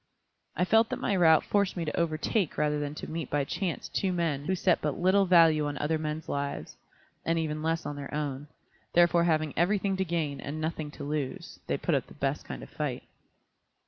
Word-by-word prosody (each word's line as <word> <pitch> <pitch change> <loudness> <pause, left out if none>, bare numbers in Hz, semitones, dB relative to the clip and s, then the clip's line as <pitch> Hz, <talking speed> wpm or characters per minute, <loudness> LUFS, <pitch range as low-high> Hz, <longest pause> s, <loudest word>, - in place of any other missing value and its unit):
I 180 - +2
felt 225 +3 +4
that - - -2
my 200 - 0
route 160 -4 +5
forced 200 -2 +1
me 170 - -1
to 150 - -3
overtake 170 +3 0
rather 150 0 +1
than 145 0 -3
to - - -7
meet 160 -3 -4
by 145 -1 +1
chance 175 +4 -3
two 190 - -1
men 165 -5 -1
who 190 - +1
set 180 -1 +2
but 150 -2 -1
little 190 +2 +3
value 165 -4 +5
on 145 0 -4
other 155 +1 0
men's 155 0 -4
lives, 140 0 -3 0.5
and 165 0 +1
even 155 -2 -2
less 165 +1 -1
on 145 - -4
their 140 -1 -7
own; 145 -1 -3 0.5
therefore 175 0 +5
having 155 -3 +1
everything 195 +2 +1
to 190 - +1
gain 160 -6 -2
and 150 +3 -5
nothing 155 -1 -3
to 145 - -9
lose, 145 -2 -4
they - - 0
put - - -1
up - - 0
the - - -14
best - - -2
kind - - -7
of - - -12
a - - -23
fight. - - -3
160 Hz, 215 wpm, -29 LUFS, 150-175 Hz, 0.5 s, route